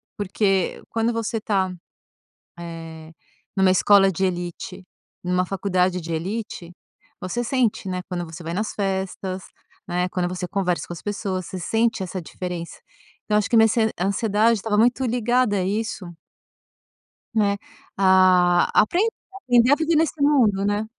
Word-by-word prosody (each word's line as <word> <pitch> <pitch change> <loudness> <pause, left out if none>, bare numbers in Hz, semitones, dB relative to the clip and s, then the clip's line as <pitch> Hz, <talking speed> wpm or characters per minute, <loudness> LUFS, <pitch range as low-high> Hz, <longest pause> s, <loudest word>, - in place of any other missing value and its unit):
porque 195 -2 0
quando 230 +1 0
você 225 -1 -2
tá, 190 -3 0 0.9
eh, 165 -2 -8 0.5
em - - 0
uma 190 - +5
escola 195 +1 +5
de 190 +1 -1
elite, 180 +1 -4 0.4
em 180 - -3
uma 180 0 +2
faculdade 185 -1 0
de 165 0 -6
elite, 175 +1 -4 0.5
você 210 +7 -3
sente, 240 -5 0
né, 180 -1 -2
quando 175 -2 -3
você 165 0 -10
vai 165 +1 -4
nas 215 +4 -2
festas, 190 -1 -3 0.4
né, 180 +1 -1
quando 180 -1 -1
você 180 0 -4
conversa 180 -3 -1
com - - -8
as - - -11
pessoas 195 -3 -3
você 185 - -6
sente 225 +3 0
essa 185 0 -4
diferença, 175 0 -6 0.5
então 210 - +1
acho 210 -1 +1
que 235 - +3
minha 225 - +6 0.3
ansiedade 210 +4 +2
estava 210 +1 -1
muito 245 +4 +3
ligada 240 -3 +1
a 185 - 0
isso 210 0 -3 1.3
né. 205 -2 +2 0.4
A 185 -2 +4
aprender 385 - +1 0.6
a - - +6
viver 320 +1 +1
nesse 315 -1 +1
mundo, 235 -9 +3
né? 205 +1 0
195 Hz, 150 wpm, -23 LUFS, 180-220 Hz, 1.3 s, minha